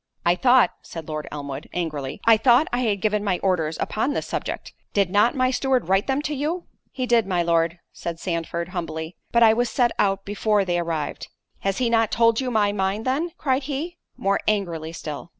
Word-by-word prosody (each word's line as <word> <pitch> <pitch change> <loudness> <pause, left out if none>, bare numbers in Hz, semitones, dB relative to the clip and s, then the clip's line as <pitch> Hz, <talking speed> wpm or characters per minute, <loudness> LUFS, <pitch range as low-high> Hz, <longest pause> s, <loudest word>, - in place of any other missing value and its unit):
"I 170 - +5
thought," 250 +5 +4
said 165 -2 -9
Lord 155 -1 -4
Elmwood, 140 -1 -6
angrily, 155 -3 -3
"I 230 0 +8
thought 245 +6 +4
I 245 - +1
had 210 -6 0
given 210 0 +1
my 195 -3 +1
orders 165 -5 +1
upon 245 +7 -1
the - - -1
subject—did 200 -3 -3
not 210 +7 +4
my 255 -1 +2
steward 260 -1 +1
write 195 +1 +2
them 270 +2 0
to 300 - -2
you?" 310 +5 -2 0.3
"He 255 - -2
did, 235 -4 +3
my 180 -3 +1
Lord," 165 0 +1 0.2
said 170 -1 -5
Sandford, 170 -1 -3
humbly, 165 -2 -5 0.2
"but 235 0 +5
I 220 -1 +7
was 240 +1 +1
set 245 -2 +2
out 195 -1 +1
before 205 0 +1
they 175 -1 0
arrived." 165 -4 -3 0.3
"Has 195 0 -1
he 250 - +1
not 225 -2 +3
told 230 +1 +3
you 255 - -2
my 210 -4 +2
mind 200 +2 -1
then?" 280 +7 0
cried 265 -2 0
he, 305 +5 -4 0.2
more 200 +1 +1
angrily 170 -7 -1
still. 155 0 -7
205 Hz, 200 wpm, -23 LUFS, 170-245 Hz, 0.3 s, I